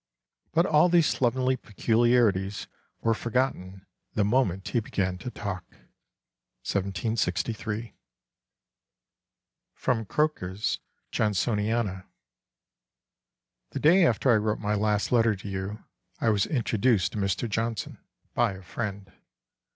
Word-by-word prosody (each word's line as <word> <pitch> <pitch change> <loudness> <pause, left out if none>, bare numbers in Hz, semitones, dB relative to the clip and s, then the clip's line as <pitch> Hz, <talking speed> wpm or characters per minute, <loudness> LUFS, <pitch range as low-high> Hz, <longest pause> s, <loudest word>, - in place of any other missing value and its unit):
But 170 +2 +4
all 155 +1 +4
these 170 -2 +5
slovenly 130 0 +1
peculiarities 110 -3 +1 0.4
were 115 - +2
forgotten 110 -6 -2 0.3
the 105 - +3
moment 105 -5 +1
he 120 - +1
began 95 -4 -2
to 110 - -5
talk." 100 -6 -5 1.0
1763. 105 +3 -2 1.8
[Sidenote: 115 -4 -1
Croker's 105 -9 -1 0.3
Johnsoniana.] 105 -1 0 1.6
"The - - -4
day 175 +5 +6
after 125 -3 +3
I 115 - +5
wrote 105 0 0
my 105 -1 -1
last 105 0 +1
letter 115 -3 +4
to 100 +1 -9
you 95 +2 -4 0.4
I 115 - +2
was 100 -2 +1
introduced 115 - +1
to 105 - -4
Mr. 100 +4 0
Johnson 115 0 -3 0.3
by 120 -4 +2
a 95 0 -11
friend. 100 -1 -5
110 Hz, 110 wpm, -27 LUFS, 100-120 Hz, 1.8 s, day